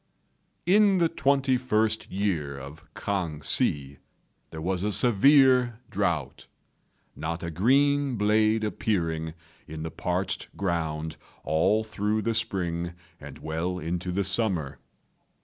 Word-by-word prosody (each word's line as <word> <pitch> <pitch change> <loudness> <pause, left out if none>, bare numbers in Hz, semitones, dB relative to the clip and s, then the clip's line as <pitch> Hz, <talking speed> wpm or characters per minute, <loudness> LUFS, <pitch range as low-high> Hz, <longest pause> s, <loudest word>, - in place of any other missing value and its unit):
In 200 +2 +5
the 170 -2 +3
twenty 135 -3 +2
first 110 -3 0
year 85 -8 -2
of 70 +3 -11
K'ang 85 -7 -3
Hsi 70 0 0 0.5
there 80 - -8
was 90 +3 -2
a 105 - 0
severe 125 +2 +4
drought, 85 -9 -2 0.7
not 85 +2 -4
a 85 - -4
green 140 - +2
blade 110 +1 +2
appearing 85 -7 -1 0.3
in 80 0 -7
the 80 - -5
parched - - -2
ground 80 -4 -2 0.3
all 95 +8 +2
through 110 0 -1
the 115 - 0
spring 85 -6 -2 0.3
and - - -10
well 80 +4 -3
into 90 +2 -3
the 100 +3 0
summer. 95 -8 0
95 Hz, 120 wpm, -27 LUFS, 80-110 Hz, 0.7 s, In